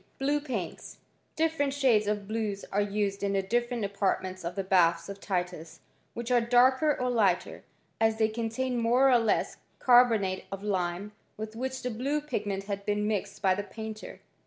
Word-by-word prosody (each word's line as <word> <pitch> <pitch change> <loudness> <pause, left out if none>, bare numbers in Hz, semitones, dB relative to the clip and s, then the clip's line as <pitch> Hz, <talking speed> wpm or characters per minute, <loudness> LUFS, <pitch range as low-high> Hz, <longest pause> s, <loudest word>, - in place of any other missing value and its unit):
Blue 285 +2 +1
paints. 235 - -5 0.4
Different 310 -3 0
shades 240 -7 +3
of 205 -1 -2
blues 215 -2 -3
are 205 - +2
used 200 -1 -1
in 200 0 0
the 195 -1 +1
different 240 +2 -1
apartments 190 -2 -2
of 170 +1 -4
the 195 - -2
baths 170 -2 +3
of 200 0 -7
Titus, 180 -4 -4 0.3
which 235 +1 -4
are 245 -1 +5
darker 260 +5 +4
or 250 - 0
lighter, 230 -5 +1 0.4
as 220 0 +2
they 220 -1 +3
contain 235 +3 -2
more 245 +4 +4
or 245 - +6
less 225 -2 0 0.2
carbonate 230 -7 +4
of 195 0 -6
lime 190 0 -2 0.3
with 215 +1 -6
which 260 +2 -4
the 250 - -2
blue 270 +7 -1
pigment 205 -9 -3
bad 200 -1 -4
been 210 0 0
mixed 205 -2 -3
by 190 -1 +4
the 195 - -2
painter. 220 0 -8
215 Hz, 175 wpm, -29 LUFS, 195-245 Hz, 0.4 s, or